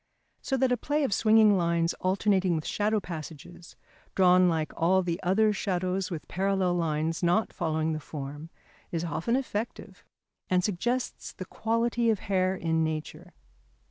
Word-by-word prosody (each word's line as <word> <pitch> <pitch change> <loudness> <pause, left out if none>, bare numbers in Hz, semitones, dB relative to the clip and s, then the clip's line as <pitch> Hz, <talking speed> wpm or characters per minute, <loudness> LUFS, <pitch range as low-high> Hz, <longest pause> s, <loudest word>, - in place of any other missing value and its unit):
So 270 - -1
that 260 0 +2
a 250 - +2
play 295 +3 -1
of 260 - 0
swinging 215 -1 +5
lines 170 -1 +1
alternating 190 -1 +1
with 155 - -3
shadow 215 +1 0
passages, 170 -1 -9 0.4
drawn 180 -1 +5
like 160 -2 -1
all 185 +3 +2
the 175 +1 -3
other 210 +4 +3
shadows 185 -1 -1
with 165 -5 -6
parallel 190 -1 0
lines 160 -1 -1
not 175 +5 +1
following 160 0 -1
the 155 - -3
form, 145 +1 -7 0.4
is 165 -1 -2
often 170 +8 -1
effective, 240 -4 -4 0.5
and 180 0 +2
suggests 240 +7 -2
the 185 - -7
quality 230 +3 0
of 220 - +2
hair 185 -1 +1
in 160 -2 0
nature. 160 +2 -5
185 Hz, 150 wpm, -28 LUFS, 165-210 Hz, 0.5 s, swinging